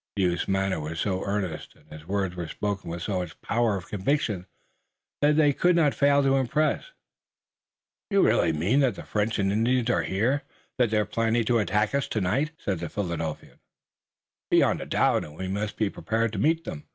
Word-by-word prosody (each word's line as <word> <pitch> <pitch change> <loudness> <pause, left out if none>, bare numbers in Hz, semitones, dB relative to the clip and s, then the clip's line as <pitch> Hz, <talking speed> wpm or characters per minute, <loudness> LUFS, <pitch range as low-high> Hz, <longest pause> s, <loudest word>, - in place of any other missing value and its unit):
The 100 - +1
youth's 90 -1 0
manner 95 -2 0
was 80 +2 -5
so 95 -2 -1
earnest 100 -5 -3
and 75 - -25
his 75 +1 -11
words 95 -2 -1
were 85 -2 -4
spoken 100 +2 -3
with 85 0 -5
so 95 -3 -1
much 90 -1 -6
power 115 -2 +1
of 90 - -9
conviction 105 -3 -1 0.7
that 150 +1 +4
they 145 -2 +5
could 175 +5 +3
not 155 -4 +3
fail 140 0 +3
to 135 0 +3
impress. 150 +4 +1 1.2
"You 200 -2 +4
really 85 - +3
mean 90 - +1
that 130 -7 +2
the - - -8
French 110 +1 -1
and 100 -2 +1
Indians 120 +3 +2
are 90 - +2
here, 110 - 0 0.4
that 120 -3 +4
they're 105 -1 +1
planning 115 +2 +1
to 120 +1 +2
attack 105 +2 +1
us 140 -1 0
tonight?" 110 +9 0
said 95 -4 -3
the 85 -1 -4
Philadelphian. 85 -5 -4 0.9
"Beyond - - +3
a - - -6
doubt - - +2
and 75 +1 -11
we 95 - -4
must 100 +2 -3
be 110 - +1
prepared 110 +3 -1
to 100 - -3
meet 160 +5 +2
them." 75 - -7
105 Hz, 195 wpm, -26 LUFS, 90-125 Hz, 1.2 s, they